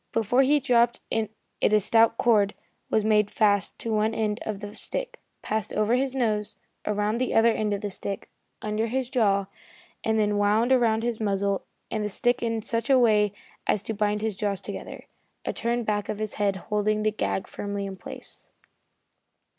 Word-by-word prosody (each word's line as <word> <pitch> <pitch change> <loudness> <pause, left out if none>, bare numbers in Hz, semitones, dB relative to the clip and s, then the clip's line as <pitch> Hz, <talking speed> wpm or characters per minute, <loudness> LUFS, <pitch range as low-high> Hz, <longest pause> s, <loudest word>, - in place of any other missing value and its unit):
Before 230 +3 +3
he 290 +2 +4
dropped 240 -3 +3
it 220 -2 0 0.3
a 215 0 +4
stout 225 +2 +3
cord 210 -4 +3 0.3
was 215 - +2
made 210 -1 +3
fast 205 -2 +2
to 230 - -3
one 215 +1 +1
end 210 -2 0
of 210 -2 -3
the 205 0 -7
stick, - - -4 0.2
passed 215 0 -1
over 215 +2 +2
his 265 +1 +1
nose, 215 -5 0 0.3
around 210 +2 0
the 255 - -1
other 230 +1 +6
end 215 -1 -1
of 200 -1 -1
the 205 - -3
stick, 195 +1 -5 0.4
under 215 +1 -1
his 255 +2 -2
jaw, 200 -6 +2 0.6
and 220 0 +1
then 210 -1 +2
wound 215 +4 +3
around 230 -3 +3
his 235 -2 -1
muzzle 200 -2 0 0.3
and 215 -1 -1
the 210 - -1
stick 245 +4 +1
in 225 -2 -1
such 230 +3 -2
a 270 - +6
way 210 -4 +4 0.4
as 205 - +1
to 225 - -3
bind 210 0 0
his 220 -3 -1
jaws 200 -1 -1
together, - - -8 0.4
a - - -1
turn 235 +1 -1
back 205 -2 -1
of 215 - -2
his 215 -1 -3
head 200 -1 +2
holding 210 +2 0
the 215 - +2
gag 210 -2 -2
firmly 200 -1 -4
in 195 -1 -5
place. - - -9
215 Hz, 185 wpm, -26 LUFS, 205-230 Hz, 0.6 s, other